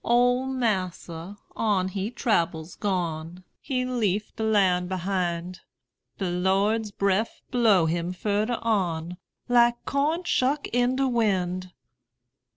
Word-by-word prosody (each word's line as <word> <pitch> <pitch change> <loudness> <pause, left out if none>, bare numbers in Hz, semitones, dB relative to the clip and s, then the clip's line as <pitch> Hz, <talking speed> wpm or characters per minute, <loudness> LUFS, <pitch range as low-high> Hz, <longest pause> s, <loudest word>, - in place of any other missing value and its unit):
Ole 245 +2 +3
massa 190 -7 -2 0.2
on 200 -4 +1
he 195 +2 -3
trabbels 170 -9 -1
gone; 175 -3 -3 0.2
He 255 -2 -2
leaf 215 -5 -1
de 225 - -6
land 190 -5 +2
behind: 180 -1 -2 0.6
De 190 - -2
Lord's 195 +5 +1
breff 200 +2 0
blow 220 -8 +4
him 170 +2 -1
furder 210 +5 -1
on, 180 -6 -1 0.3
Like 240 -1 +3
corn 300 +5 0
shuck 285 -3 +1
in 245 +1 +2
de 270 0 +1
wind. 185 -6 0
200 Hz, 115 wpm, -26 LUFS, 180-240 Hz, 0.6 s, blow